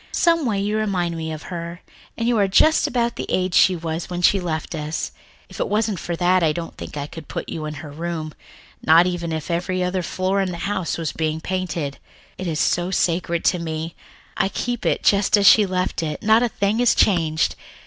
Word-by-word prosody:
Someway 315 - +2
you 205 +2 0
remind 185 -6 -1
me 160 -1 -4
of 155 0 -6
her, 170 0 -5 0.4
and 230 - -1
you 240 - +3
are 200 - +3
just 310 +11 +4
about 235 -1 -1
the - - -4
age 185 -1 0
she 185 - +5
was 165 0 -4
when 175 0 -4
she 195 - +5
left 165 -3 -3
us. 155 0 -3 0.4
If - - -12
it - - 0
wasn't 210 -3 0
for 170 - -3
that, 180 +2 +3
I 160 -2 +3
don't 165 +1 -6
think - - -8
I 145 - -3
could 155 0 -10
put - - -5
you 155 -2 -4
in 150 0 -5
her 145 - -9
room, 160 0 -4 0.5
not 165 +2 +6
even 175 -2 -2
if 160 +2 -3
every 180 +2 -1
other 180 +1 -1
floor 185 +3 -1
in 190 - -1
the 175 - -5
house 195 -4 -2
were 165 - -4
being 155 -1 -1
painted. 170 -6 -3 0.4
It 185 - -3
is 160 -2 -2
so 175 +1 +1
sacred 170 -2 0
to 180 - +3
me. 160 0 -4 0.4
I 195 - +1
keep 240 +3 -3
it - - 0
just 200 +1 +4
as 200 - +2
she 210 -2 +7
left 185 -1 -1
it, 155 -2 -4
not 220 +2 +5
a 245 - +2
thing 200 +2 0
is 245 -1 +4
changed. 160 -5 +2
175 Hz, 220 wpm, -22 LUFS, 160-200 Hz, 0.5 s, she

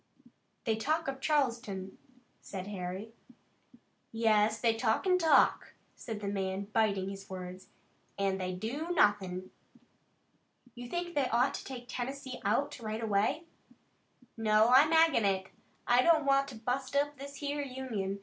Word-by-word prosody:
"They 220 -2 +1
talk 310 +8 0
of 270 0 -4
Charleston," 235 -11 -1 0.4
said 190 -2 -7
Harry. 195 +2 -6 1.0
"Yes, 220 -1 +2
they 230 -2 +3
talk 225 - 0
an' 365 -1 +3
talk," 325 -2 +3 0.2
said 220 -3 -6
the 200 - -4
man, 195 -1 -2
biting 200 -4 +1
his 195 0 -9
words, 185 0 -8 0.5
"an' 195 -1 0
they 185 0 -2
do 235 - -4
nothin'." 185 - +1 1.2
"You 245 0 -9
think 345 +2 -3
they 280 -4 +1
ought 245 +4 +2
to - - -5
take 250 -2 -8
Tennessee 260 +1 -5
out 235 +8 0
right 220 0 -4
away?" 220 +9 +1 0.9
"No, 220 0 +3
I'm 275 +5 +6
ag'in 325 -7 +5
it. 190 -1 0 0.4
I 245 +1 +5
don't 315 0 +4
want 275 0 +3
to 270 - -9
bust 255 +4 -3
up 290 0 0
this 280 +1 -8
here 290 0 -3
Union. 250 -8 -4
230 Hz, 145 wpm, -31 LUFS, 200-275 Hz, 1.2 s, I'm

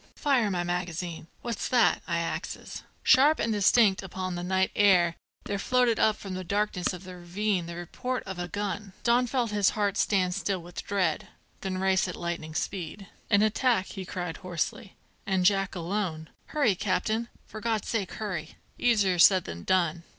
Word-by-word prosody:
Fire 260 -7 +2
my 180 -2 -1
magazine! 175 -1 -3 0.2
what's 235 -1 -3
that? 245 -2 +3
I 170 -2 0
axes." 170 0 -4 0.2
Sharp 285 +4 +6
and 225 - 0
distinct 205 0 +4
upon 185 -1 -4
the 175 - -4
night 190 +1 +1
air 180 -4 +4 0.3
there 200 -1 -3
floated 245 +1 +2
up 215 - +4
from 195 -3 -7
the 185 0 -4
darkness 200 0 0
of 180 0 -8
the 185 -1 -9
ravine 180 +1 -1
the 170 - -6
report 250 +9 -4
of 190 -2 -6
a 175 - -3
gun. 200 +2 -4
Don 245 +1 +3
felt 240 -3 0
his 205 -2 +3
heart 205 -1 +1
stand 185 -3 +2
still 195 0 -1
with 175 0 -8
dread, 185 -6 0 0.3
then 190 -1 -3
race 190 0 +2
at 180 - -5
lightning 170 -2 -5
speed. 195 +3 -4 0.2
"An 205 -1 +5
attack!" 215 -2 +2
he 190 - -6
cried 180 -2 -5
hoarsely; 185 +1 -4 0.3
"and 190 -2 +1
Jack 195 0 +2
alone! 170 -3 -3 0.2
Hurry, 285 -9 +2
captain! 215 +5 -1 0.2
for 215 - -9
God's 225 -2 -1
sake 205 -5 -2
hurry! 180 -7 -5 0.2
Easier 205 -7 +3
said 185 +1 +7
than 85 0 -7
done. 170 - +1
190 Hz, 175 wpm, -28 LUFS, 175-210 Hz, 0.3 s, said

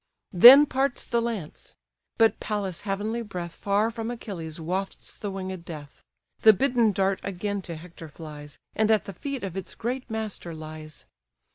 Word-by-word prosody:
Then 250 +11 +10
parts 270 -1 -1
the 235 0 0
lance: 225 -9 -5 0.4
but 225 -1 +4
Pallas' 200 -4 -3
heavenly 210 +3 -2
breath 175 -6 -6
Far 205 +3 0
from 225 0 -5
Achilles 175 -9 -6
wafts 185 +4 -4
the 205 - -5
winged 190 -2 -5
death: 150 -4 -10 0.4
The 220 - +8
bidden 240 0 +2
dart 195 0 0
again 200 +1 -3
to 170 -2 -6
Hector 165 0 -11
flies, 150 -1 -10 0.2
And 220 0 +1
at 220 -1 +3
the 195 - -7
feet 275 - -5
of 190 -3 -5
its 190 - -6
great 250 +3 -4
master 215 -6 -4
lies. 155 0 -9
195 Hz, 160 wpm, -26 LUFS, 170-225 Hz, 0.4 s, Then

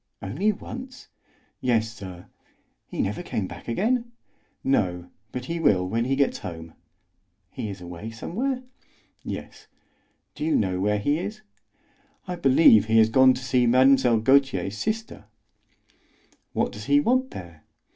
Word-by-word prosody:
"Only 145 - 0
once?" 250 +5 -9 0.5
"Yes, 115 -3 +1
sir." 95 -4 -10 0.6
"He - - -2
never 105 +2 -3
came 105 - -3
back - - -10
again?" 235 - 0 0.5
"No, 90 -9 0 0.2
but 125 0 -5
he 170 +4 -3
will 95 - +3
when 115 +4 -1
he 135 +2 +1
gets 140 0 +1
home." 80 -1 -8 0.8
"He 110 - -5
is 95 -2 -8
away 90 +5 -7
somewhere?" 250 - -3 0.6
"Yes." - - -8 0.7
"Do - - -6
you 160 - +1
know 95 -3 0
where 105 +2 +1
he 145 +9 0
is?" 215 +4 -5 0.9
"I 180 - -3
believe 135 - +6
he 110 +1 +2
has 110 0 +6
gone 130 +1 +6
to 125 - -7
see 125 0 +2
Mlle. 130 -2 +4
Gautier's 120 -7 +2
sister." 220 - -4 1.3
"What - - 0
does - - -9
he 290 - +4
want 260 -1 +1
there?" 85 -4 -10
125 Hz, 145 wpm, -25 LUFS, 100-165 Hz, 1.3 s, believe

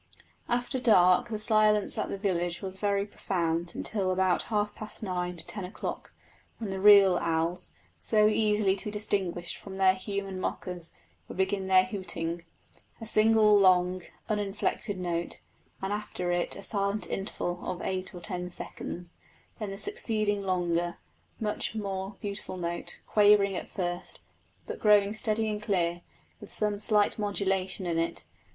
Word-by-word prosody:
After 245 +2 0
dark 185 -4 +5
the 220 - -2
silence 215 -1 +4
at - - -2
the - - -3
village 175 -2 -1
was 190 0 -6
very 200 0 0
profound 170 -4 -2
until 195 -4 -1
about 185 -1 +2
half 210 -1 0
past 215 +1 -8
nine 180 -2 -2
to 165 - 0
ten 205 -2 -6
o'clock, 180 +3 -6 0.5
when 215 -4 -4
the 190 - -3
real 195 -2 +7
owls, 165 +2 -1 0.2
so 215 -1 +3
easily 210 -2 +2
to - - -6
be - - -2
distinguished 190 -4 -2
from 190 -1 -9
their 190 -1 +5
human 195 0 -4
mockers, 180 -3 -4 0.3
would - - -9
begin 190 0 0
their 185 -1 +6
hooting 170 -6 -3 0.6
a 225 - -7
single, 215 -1 +5
long, 185 -1 +4 0.3
uninflected 205 -1 -1
note, 175 -2 -3 0.4
and 195 +1 -1
after 195 -4 -3
it 175 0 0
a 200 - -9
silent 200 0 -1
interval 180 -2 -3
of 180 -1 -4
eight 185 -1 -2
or 175 - -8
ten 180 -1 -4
seconds; 175 0 -7 0.5
then 210 -2 -3
the 195 - -6
succeeding 215 - 0
longer, 175 -2 0 0.4
much 215 0 -2
more 195 -1 -4
beautiful 200 -2 -5
note, 170 -1 -3
quavering 205 -2 +4
at - - -5
first, 175 -2 -4 0.5
but - - -6
growing 205 -1 +4
steady 220 0 0
and 210 -1 -2
clear, 175 -4 0 0.4
with 210 - -11
some 210 -1 0
slight 210 0 +2
modulation 195 -2 -1
in 170 -1 0
it. 165 - -2
195 Hz, 155 wpm, -29 LUFS, 180-210 Hz, 0.6 s, real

